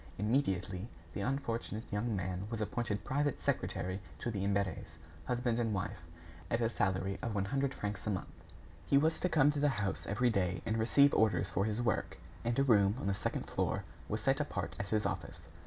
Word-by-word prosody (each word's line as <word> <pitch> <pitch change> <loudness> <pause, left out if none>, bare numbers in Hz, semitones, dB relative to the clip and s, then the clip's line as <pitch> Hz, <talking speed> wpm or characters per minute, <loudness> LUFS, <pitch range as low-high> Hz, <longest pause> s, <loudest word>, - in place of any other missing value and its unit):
Immediately, 95 -4 0 0.3
the - - -3
unfortunate 115 -3 -2
young 105 +2 0
man 95 +1 -2
was 115 -1 -3
appointed 105 -1 -1
private 145 +3 0
secretary 95 +1 -1 0.2
to 120 - -3
the 100 -3 -2
Imberts, 100 -5 -1 0.3
husband 120 -1 +1
and 115 -3 +1
wife, 95 -3 -3 0.5
at 115 - +1
a 115 -1 +1
salary 95 -1 0
of 115 -3 -2
one 100 -1 +1
hundred 135 +4 0
francs 105 -4 -4
a - - +2
month. 95 -2 -4 0.4
He 140 - +5
was 160 +3 +3
to 180 - +1
come 150 -3 +5
to 145 - -2
the 145 0 +4
house 105 -7 -2
every 120 +4 +2
day 90 -4 0
and 110 0 0
receive 140 +5 +5
orders 105 -3 +3
for 95 +4 +1
his 110 +2 -1
work, 110 - 0 0.3
and 120 0 0
a 135 - +5
room 105 -6 +5
on - - -4
the 100 - +2
second - - -2
floor - - -1 0.3
was 105 +1 -1
set 135 +5 +3
apart 95 - -3
as 100 -1 -3
his 110 -1 +1
office. 85 -4 -4
105 Hz, 200 wpm, -34 LUFS, 95-120 Hz, 0.5 s, He